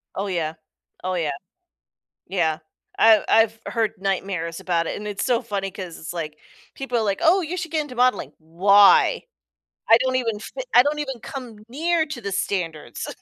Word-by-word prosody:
Oh, 200 +1 -2
yeah. 165 -4 -2 0.5
Oh, 185 - -1
yeah. 160 -4 -1 1.0
Yeah. 160 -5 0 0.4
I've 220 -2 +7
I've 225 0 +3
heard 225 -2 -1
nightmares 190 -4 -2
about 170 -2 0
it, - - -3
and 210 - -6
it's 205 -1 -3
so 245 -2 +2
funny 200 -5 -4
'cause 185 -4 -8
it's 165 - -7
like, 155 -3 -5 0.4
people 265 -3 -3
are - - +1
like, 200 -2 -1
"Oh, 350 +4 +5
you 340 +1 -4
should 325 -3 -5
get 315 - 0
into 285 -4 -8
modeling." 250 +1 +1
Why? 195 +6 +5 0.7
I 230 - +9
don't 255 +1 0
even 230 -4 -1
fit - - -7
I - - +9
don't 295 +2 -1
even 265 -5 -5
come 250 -4 -8
near 320 +5 0
to 290 -5 -7
the 200 -1 -4
standards. 175 -5 -3
210 Hz, 180 wpm, -23 LUFS, 180-255 Hz, 1.0 s, I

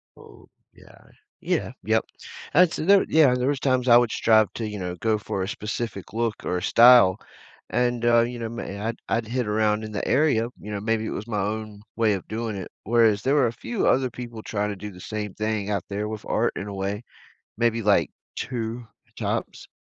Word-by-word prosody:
Oh - - -16 0.3
yeah, - - -19 0.4
yeah, - - -1
yep, - - +1 0.5
that's 180 -2 +5
there 195 +4 +4
yeah 150 -5 +5
there 125 +1 -1
was 140 -1 0
times 130 -2 +1
I 120 - +8
would 120 -2 +2
strive 110 -2 +3
to, 110 -2 -4
you 105 -1 -6
know, 90 -1 -4
go 110 -1 +2
for 100 -2 -3
a - - -3
specific 105 -1 -5
look 115 -1 0
or 90 - -1
a - - -3
style, 115 -5 +7 0.5
and, 120 -1 0
uh, 120 -1 +5
you 120 +1 -3
know, 115 -1 -4
my 100 -4 -6
I'd 115 - -3
I'd 115 -1 0
hit 125 0 -2
around 105 0 +1
in 110 - -6
the 100 - -3
area, 130 -5 +2
you 105 - -8
know, 105 - -3
maybe 110 +1 -1
it - - -3
was 105 - -5
my 105 -3 -1
own 105 0 -4
way 110 -2 +2
of 95 - -5
doing 110 -1 -3
it. 95 - -6
Whereas 110 -2 +3
there 135 +2 +2
were 140 -4 +4
a - - -2
few 225 - -2
other 130 -1 +3
people 120 -2 -8
trying 105 -1 -2
to 100 - -4
do 105 +1 -8
the 90 - -13
same 105 -2 -5
thing 110 -2 -2
out 100 -4 -1
there 105 +1 -3
with 110 0 -6
art - - +1
in 100 - -5
a 100 - -6
way, 100 +3 -3 0.5
maybe, 115 0 +1
like, 100 -7 +3 0.3
2 120 -1 -4 0.3
times, - - -3
110 Hz, 215 wpm, -24 LUFS, 105-120 Hz, 0.5 s, I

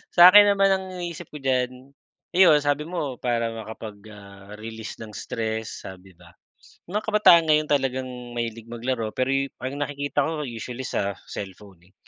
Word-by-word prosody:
sa 180 +1 +10
akin 205 0 +8
naman 195 0 +4
ang 190 0 0
iniisip 175 -1 -6
ko - - -6
diyan, 130 0 -1 0.4
iyon 175 -5 +7
sabi 145 +1 +1
mo 150 -8 -4
para 115 -2 0
makapag 110 -1 -8
ah, 100 0 -12
release 110 0 -8
ng 110 -2 -9
stress 110 0 -4
sabi 95 0 -12
ba, 90 +1 -18 0.6
mga 210 - 0
kabataan 195 -6 +6
ngayon 155 0 +2
talagang 130 -2 0 0.2
mahilig 115 -1 -4
maglaro 115 -1 -3
pero 130 +1 0 0.3
ang 135 +2 -4
nakikita 145 0 -1
ko 160 -2 -3
usually 125 0 -6
sa 100 -5 -2 0.2
cellphone 95 -1 -8
eh. - - -33
125 Hz, 160 wpm, -24 LUFS, 110-150 Hz, 0.6 s, sa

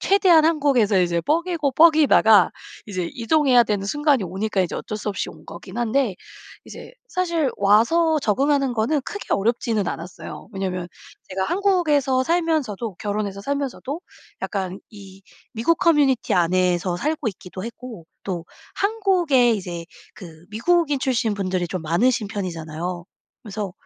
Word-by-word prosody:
최대한 370 -5 +5
한국에서 275 - +3
이제 170 -1 +1
뻐기고 330 - 0
뻐기다가 285 - +5 0.4
이제 185 -4 -3
이동해야 250 +1 +3
되는 200 -3 -2
순간이 295 -1 +1
오니까 195 +3 -2
이제 175 - -4
어쩔 215 - -5
수 210 - -4
없이 195 - -4
온 155 0 -16
거긴 185 +5 -9
한데 240 -2 +1 0.5
이제 - - -11 0.2
사실 340 -6 0
와서 300 +11 +3
적응하는 275 +3 +1
거는 260 +7 +1
크게 410 +9 -6
어렵지는 220 -1 0
않았어요. 170 +2 -8
왜냐하면 185 -3 -3 0.4
제가 190 0 -1
한국에서 310 - +1
살면서도 295 - -1
결혼해서 205 -1 -3
살면서도 280 +4 -4 0.4
약간 190 -2 -3
이 195 -3 -13 0.3
미국 300 +9 +1
커뮤니티 295 -8 +2
안에서 180 0 +1
살고 300 -5 -1
있기도 185 -1 -8
했고 230 -6 -9 0.2
또 175 -4 -4 0.3
한국에 370 - +2
이제 175 -5 -5 0.3
그 165 -4 -13
미국인 295 +6 +1
출신 235 -4 0
분들이 185 -3 -2
좀 185 -1 -4
많으신 210 +7 +1
편이잖아요. 175 -2 -5 0.4
그래서 205 -3 -5
225 Hz, 330 characters per minute, -22 LUFS, 190-295 Hz, 0.5 s, 최대한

